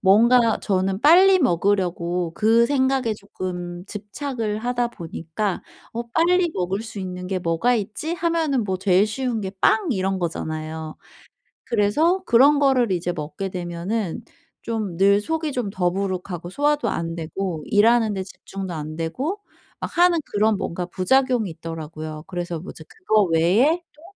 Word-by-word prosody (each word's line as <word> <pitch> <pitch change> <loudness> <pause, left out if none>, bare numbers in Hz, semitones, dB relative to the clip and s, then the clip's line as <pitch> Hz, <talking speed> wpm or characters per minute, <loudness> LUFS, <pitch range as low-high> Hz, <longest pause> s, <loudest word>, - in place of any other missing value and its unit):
뭔가 230 +4 +5
저는 190 0 0
빨리 370 +6 +6
먹으려고 175 - 0
그 225 +2 +4
생각에 260 -3 +1
쪼끔 180 -3 -6
집착을 215 +2 -4
하다 245 +1 0
보니까 170 +1 -4 0.3
'어 235 - -3
빨리 350 +6 +3
먹을 185 +3 -1
수 220 -2 -7
있는 180 -1 -5
게 185 0 -2
뭐가 170 +9 +1
있지?' 230 - -3
하면은 330 -6 0
뭐 190 -3 -2
제일 190 0 +4
쉬운 235 +1 -2
게 190 -2 -4
빵 410 -5 +3
이런 190 -3 -1
거잖아요. 160 -2 -4 0.7
그래서 295 - +2
그런 275 +5 +6
거를 260 -6 +3
이제 175 0 -1
먹게 170 +4 -5
되면은 180 +2 -3 0.4
좀 215 -6 -3
늘 200 +1 +5
속이 320 +3 -2
좀 245 -6 -2
더부룩하고 180 -2 -2
소화도 295 +6 +1
안 165 0 -3
되고 170 0 -4
일하는데 215 -2 +3
집중도 190 -1 -7
안 155 0 -6
되고 260 - -3 0.4
막 - - -6
하는 350 0 +5
그런 210 0 +2
뭔가 180 -2 -3
부작용이 240 +5 +1
있더라고요. 155 -1 -7
그래서 175 -2 -4
뭐 170 - -8
이제 160 - -12
그거 215 - +1
외에 210 - +3 0.2
또 300 - -20
200 Hz, 300 characters per minute, -23 LUFS, 175-245 Hz, 0.7 s, 빨리